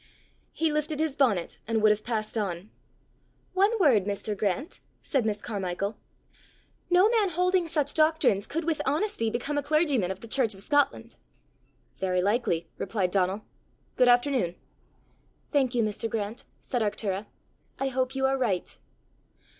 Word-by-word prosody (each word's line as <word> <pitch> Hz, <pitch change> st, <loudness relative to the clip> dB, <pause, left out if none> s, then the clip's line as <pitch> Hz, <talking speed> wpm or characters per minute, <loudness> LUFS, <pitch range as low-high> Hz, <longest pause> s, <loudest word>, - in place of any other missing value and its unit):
He 320 Hz, -1 st, 0 dB
lifted 300 Hz, 0 st, -1 dB
his 315 Hz, -3 st, 0 dB
bonnet, 215 Hz, -11 st, +1 dB
and 225 Hz, 0 st, +1 dB
would 215 Hz, -, +7 dB
have 210 Hz, 0 st, 0 dB
passed 220 Hz, -2 st, -3 dB
on. 195 Hz, -2 st, -3 dB, 0.8 s
"One 390 Hz, +2 st, +4 dB
word, 250 Hz, -, +4 dB
Mr. 205 Hz, +1 st, -3 dB
Grant," 205 Hz, -, -2 dB, 0.2 s
said 260 Hz, -6 st, 0 dB
Miss 210 Hz, -1 st, -2 dB
Carmichael. 200 Hz, -1 st, -3 dB, 0.5 s
" -, -, -35 dB
No 390 Hz, -, +7 dB
man 440 Hz, -4 st, +2 dB
holding 360 Hz, +1 st, +1 dB
such 295 Hz, -3 st, 0 dB
doctrines 310 Hz, -10 st, +3 dB
could 330 Hz, +3 st, -2 dB
with 330 Hz, -2 st, 0 dB
honesty 290 Hz, -, 0 dB
become 280 Hz, +6 st, -1 dB
a -, -, -1 dB
clergyman 285 Hz, -, +1 dB
of 190 Hz, 0 st, -5 dB
the 230 Hz, -, -9 dB
church 230 Hz, -3 st, +1 dB
of 190 Hz, -, -8 dB
Scotland." 290 Hz, +3 st, 0 dB, 0.8 s
"Very 185 Hz, -1 st, 0 dB
likely," 200 Hz, -3 st, 0 dB
replied 190 Hz, -3 st, -1 dB
Donal, 195 Hz, +2 st, 0 dB, 0.5 s
"Good 250 Hz, -, +4 dB
afternoon." 245 Hz, -7 st, +3 dB, 1.0 s
"Thank 265 Hz, -4 st, +2 dB
you, 235 Hz, -, +3 dB
Mr. 215 Hz, +1 st, -2 dB
Grant!" 220 Hz, +2 st, -4 dB, 0.2 s
said 245 Hz, -3 st, -2 dB
Arctura. 205 Hz, -1 st, -2 dB, 0.5 s
"I 270 Hz, -, -1 dB
hope 260 Hz, 0 st, -1 dB
you 265 Hz, 0 st, +1 dB
are 270 Hz, 0 st, +1 dB
right." 200 Hz, -8 st, -1 dB
240 Hz, 155 wpm, -27 LUFS, 205-290 Hz, 1.0 s, would